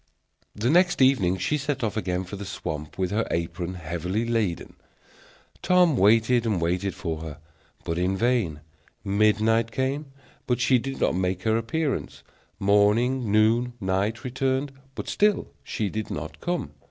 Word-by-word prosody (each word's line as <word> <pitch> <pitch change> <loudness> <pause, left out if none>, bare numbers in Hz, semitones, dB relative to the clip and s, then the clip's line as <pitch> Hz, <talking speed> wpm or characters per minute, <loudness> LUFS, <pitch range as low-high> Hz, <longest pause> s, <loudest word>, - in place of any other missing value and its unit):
The 115 +5 +1
next 180 +2 +4
evening 115 -9 +4
she 150 +11 0
set 140 -2 -2
off 110 - -1
again 90 -4 -1
for 95 +2 -8
the 100 - -6
swamp, 75 -6 -6
with 95 -1 -1
her 110 +2 0
apron 85 +2 -3
heavily 90 +6 -3
laden. 110 -7 -1 0.9
Tom 180 -4 +4
waited 115 +3 +4
and 110 -6 0
waited 90 +3 -1
for 80 -4 -4
her, 80 -2 -7 0.5
but 85 +1 -2
in 95 +2 0
vain; 115 -10 0 0.4
midnight 110 +3 +2
came, 135 +5 -2 0.4
but 125 -1 +1
she 125 0 +4
did 135 +3 -5
not - - +2
make 90 0 -1
her 110 0 +2
appearance; 135 +6 -2 0.3
morning, 105 +4 +2
noon, 115 +3 +3
night 100 +4 -1
returned, 130 +2 -1 0.2
but - - -6
still 210 0 +1
she 105 - -2
did 110 +2 -4
not 75 +1 -6
come. 175 - -2
110 Hz, 155 wpm, -25 LUFS, 95-125 Hz, 0.9 s, next